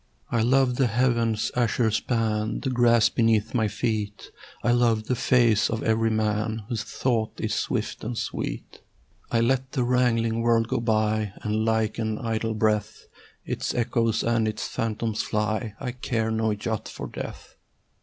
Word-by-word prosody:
I 115 Hz, -, +2 dB
love 125 Hz, +1 st, +3 dB
the 135 Hz, -, +3 dB
heaven's 115 Hz, -2 st, +1 dB
azure 120 Hz, -1 st, +2 dB
span, 110 Hz, -1 st, -1 dB
The 135 Hz, -, -1 dB
grass 120 Hz, -3 st, +4 dB
beneath 115 Hz, -2 st, +1 dB
my 110 Hz, -3 st, +2 dB
feet: 105 Hz, -1 st, -3 dB, 0.3 s
I 120 Hz, -, +3 dB
love 120 Hz, -2 st, +3 dB
the 125 Hz, -, -1 dB
face 120 Hz, -3 st, +3 dB
of 110 Hz, -1 st, -2 dB
every 115 Hz, 0 st, +2 dB
man 110 Hz, 0 st, -1 dB
Whose 115 Hz, -3 st, -1 dB
thought 115 Hz, -1 st, -1 dB
is -, -, -1 dB
swift -, -, -2 dB
and 115 Hz, +1 st, -4 dB
sweet. -, -, -5 dB, 0.5 s
I 115 Hz, -, +2 dB
let 130 Hz, +2 st, 0 dB
the 130 Hz, -4 st, +1 dB
wrangling 115 Hz, -2 st, +2 dB
world 115 Hz, -1 st, +3 dB
go -, -, 0 dB
by, 110 Hz, -2 st, 0 dB
And 110 Hz, 0 st, 0 dB
like 110 Hz, -1 st, 0 dB
an 110 Hz, -1 st, -1 dB
idle 115 Hz, -1 st, -2 dB
breath 105 Hz, -1 st, 0 dB, 0.4 s
Its -, -, -3 dB
echoes 115 Hz, -1 st, +1 dB
and 115 Hz, -1 st, +1 dB
its 110 Hz, 0 st, -3 dB
phantoms 110 Hz, -1 st, -2 dB
fly: 105 Hz, +1 st, -2 dB
I 125 Hz, -3 st, -3 dB
care 115 Hz, -3 st, -2 dB
no 110 Hz, -1 st, +1 dB
jot 105 Hz, +1 st, -4 dB
for -, -, -7 dB
death. -, -, -8 dB
115 Hz, 160 wpm, -25 LUFS, 110-120 Hz, 0.5 s, grass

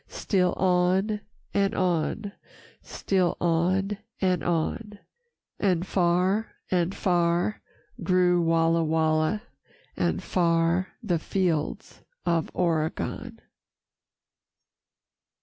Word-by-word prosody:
Still 180 Hz, -3 st, 0 dB
on 185 Hz, +3 st, +1 dB, 0.3 s
and 200 Hz, +1 st, +1 dB
on, 185 Hz, +3 st, 0 dB, 0.5 s
still 185 Hz, -3 st, -1 dB
on 185 Hz, +4 st, +1 dB, 0.2 s
and 180 Hz, -5 st, +1 dB
on, 190 Hz, +6 st, -2 dB, 0.6 s
And 180 Hz, -3 st, +1 dB
far 185 Hz, +4 st, +1 dB, 0.2 s
and 180 Hz, +1 st, +1 dB
far 175 Hz, +2 st, +1 dB, 0.4 s
grew 180 Hz, 0 st, +3 dB
Walla 165 Hz, 0 st, +2 dB
Walla, 160 Hz, +5 st, +1 dB, 0.5 s
And 85 Hz, 0 st, -1 dB
far 170 Hz, +1 st, +1 dB
the 175 Hz, -6 st, 0 dB
fields 165 Hz, -3 st, -2 dB, 0.2 s
of 165 Hz, -2 st, +1 dB
Oregon. 160 Hz, -3 st, -2 dB
180 Hz, 80 wpm, -26 LUFS, 165-190 Hz, 0.6 s, grew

